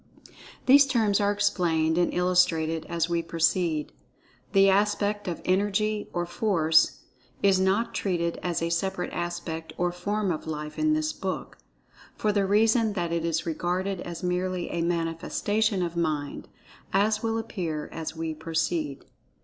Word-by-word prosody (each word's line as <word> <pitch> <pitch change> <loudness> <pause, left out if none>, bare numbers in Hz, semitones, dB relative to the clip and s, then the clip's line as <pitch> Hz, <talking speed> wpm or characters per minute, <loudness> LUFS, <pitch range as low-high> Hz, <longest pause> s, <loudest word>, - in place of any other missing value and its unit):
These 275 +1 +7
terms 220 -6 +2
are 205 0 +2
explained 170 -6 +1
and 175 0 +2
illustrated 165 -3 +2
as 170 -1 0
we 170 -1 0
proceed. 165 -1 0 0.6
The 195 0 +5
aspect 205 +1 +1
of 175 - -4
"Energy 205 +3 +1
or 175 0 -1
Force" 170 -5 +2 0.4
is 195 -2 +5
not 195 +5 +1
treated 170 -3 -1
as 175 -2 -1
a 170 - -1
separate 180 +2 -2
aspect 170 -2 -4
or 175 0 +1
form 200 +2 -1
of 160 -1 -4
Life, 150 -1 -5
in 310 0 +3
this 310 0 0
book, - - -5 0.6
for 210 - +1
the 200 -2 +1
reason 220 +2 +3
that 175 -4 -2
it 170 -1 -1
is 165 -1 -1
regarded 180 +3 -2
as 170 +1 -7
merely 180 0 -1
a 170 - -1
manifestation 175 +5 0
of 170 -1 -3
Mind, 155 -4 -2 0.4
as 210 +2 +2
will 225 0 -1
appear 175 -9 -4
as 160 0 -5
we 160 0 -3
proceed. 160 -2 -2
180 Hz, 150 wpm, -27 LUFS, 165-205 Hz, 0.6 s, These